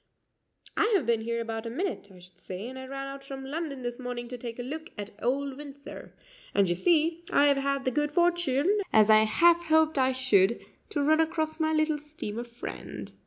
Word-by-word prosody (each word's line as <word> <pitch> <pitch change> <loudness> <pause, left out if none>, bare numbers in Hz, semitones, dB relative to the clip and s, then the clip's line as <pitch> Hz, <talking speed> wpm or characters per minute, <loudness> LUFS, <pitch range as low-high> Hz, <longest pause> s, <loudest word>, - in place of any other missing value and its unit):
"I 435 - +2
have 360 - +2
been 230 -1 +2
here 235 +1 -2
about 225 0 -4
a - - -3
minute, 335 - -3
I 185 - -15
should 180 0 -17
say, 190 +5 -7
and 260 +1 -8
I 260 - -8
ran 275 0 -5
out 275 0 -8
from 270 -1 -7
London 285 -2 -4
this 240 0 -4
morning 245 -1 -5
to 250 - -6
take 230 -1 -6
a 245 - -4
look 315 +6 -6
at 205 0 -6
old 270 +2 -1
Windsor, 285 -1 -10 0.4
and, 200 -1 +4
you 175 - +2
see, 330 - +2
I 285 - +5
have 285 -1 +4
had 275 0 -1
the 260 - +2
good 295 +3 0
fortune, 345 +1 +2
as 215 0 +6
I 215 0 +7
half 345 +9 +4
hoped 315 -2 +3
I 260 0 +3
should, 235 -5 +3 0.3
to 295 -8 -1
run 310 +2 +4
across 320 0 0
my 315 0 +1
little 310 -1 +1
steamer 265 -7 -6
friend." 235 0 -8
275 Hz, 215 wpm, -28 LUFS, 235-315 Hz, 0.4 s, I